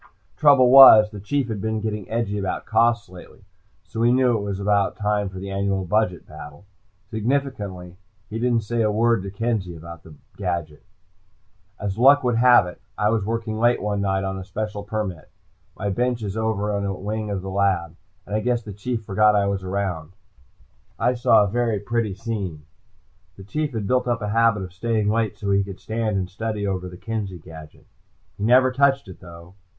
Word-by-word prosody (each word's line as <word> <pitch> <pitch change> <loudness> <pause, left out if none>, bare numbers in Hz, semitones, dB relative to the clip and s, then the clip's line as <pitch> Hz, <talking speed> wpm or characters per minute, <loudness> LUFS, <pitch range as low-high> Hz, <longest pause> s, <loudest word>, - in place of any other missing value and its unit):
Trouble 140 -5 +5
was, 110 -6 +9
the 105 - -8
Chief 130 +6 -1
had 110 -4 -4
been 110 +1 -2
getting 105 -2 -4
edgy 110 -3 -2
about 95 -1 -3
costs 115 +1 +2
lately, 90 -1 -14 0.4
so - - -8
we 120 +1 +4
knew 125 -1 +3
it 110 - -1
was 100 -1 -4
about 100 0 +1
time 105 -1 0
for 95 - -10
the 95 +1 -6
annual 95 -1 -1
budget 90 -3 0
battle. 75 +6 -12 0.5
Significantly, 105 -7 -3 0.3
he 110 +1 -5
didn't 120 -2 +1
say 115 +2 -1
a 110 - +2
word 115 0 +2
to 100 - -6
Kenzie 100 -3 -2
about 85 +1 -10
the 80 -2 -15 0.2
gadget. 85 -6 -4 1.0
As 100 +1 -4
luck 140 +3 +6
would 120 -2 +1
have 120 -4 +6
it, 90 - -10 0.2
I 105 - +2
was 110 -2 0
working 110 0 -3
late 120 +1 +3
one 100 -1 -2
night 95 -1 0
on 95 0 -3
a - - -7
special 105 +2 -5
permit. 100 -5 -5 0.5
My 100 +1 -2
bench 120 +2 -1
is 100 -1 -4
over 105 -2 -1
in 100 - -2
a 100 -1 -2
wing 105 +3 -4
of 100 -2 -3
the 95 - -5
lab, 95 -4 0 0.3
and 105 - -4
I - - +2
guess 120 +1 -1
the 105 - -8
Chief 115 +3 -4
forgot 105 +1 +3
I 100 -1 +2
was 100 -1 -2
around. 95 -4 -3 0.8
I 125 - +1
saw 115 -3 +4
a - - 0
very 115 0 0
pretty 110 -1 -2
scene. 95 -8 -5 0.7
The 95 - -11
Chief 150 +10 -3
had 110 -3 -3
built 125 +4 +1
up 120 -3 -1
a 105 - -2
habit 115 -2 +2
of 90 -1 -9
staying 105 +1 0
late 110 -2 -1
so 100 -2 -3
he 100 0 +3
could 95 -1 -9
stand 110 -2 -2
and 95 -1 -2
study 105 +2 -4
over 95 -2 -3
the 90 - -11
Kenzie 105 -3 -5
gadget. 80 -2 -13 0.5
He - - -4
never 130 +3 +5
touched 135 -1 +2
it, 95 - -11
though. 85 0 -13
105 Hz, 200 wpm, -23 LUFS, 95-115 Hz, 1.0 s, was